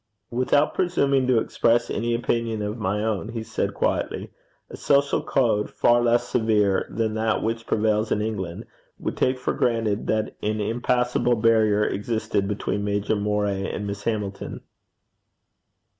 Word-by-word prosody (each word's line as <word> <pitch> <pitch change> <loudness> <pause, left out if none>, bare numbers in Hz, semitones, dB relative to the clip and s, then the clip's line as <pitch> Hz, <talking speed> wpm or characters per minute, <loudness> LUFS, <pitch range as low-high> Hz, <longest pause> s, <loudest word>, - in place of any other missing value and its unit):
'Without 130 +4 +2
presuming 140 -8 +1
to 125 -2 +4
express 115 +1 +1
any 115 +1 0
opinion 115 -2 -1
of 105 +1 -3
my 105 0 -1
own,' 110 -1 -2
he 115 -1 -4
said - - -3
quietly, - - -1 0.4
'a - - -7
social 140 -1 +2
code 110 -5 +1
far 120 0 +3
less 120 0 +2
severe 105 -5 +2
than 110 -1 -1
that 110 0 0
which 115 0 -2
prevails 110 0 +1
in - - +2
England, 100 -6 -4 0.3
would - - -4
take 130 0 +1
for 125 - -2
granted 115 -3 0
that 110 0 -1
an 110 +1 -1
impassable 125 +2 +1
barrier 110 -2 +3
existed 105 -1 -1
between 100 0 -2
Major 105 +1 0
Moray 105 -1 -1
and 105 - -4
Miss 100 0 -5
Hamilton.' 105 -3 -3
110 Hz, 145 wpm, -24 LUFS, 105-120 Hz, 0.4 s, to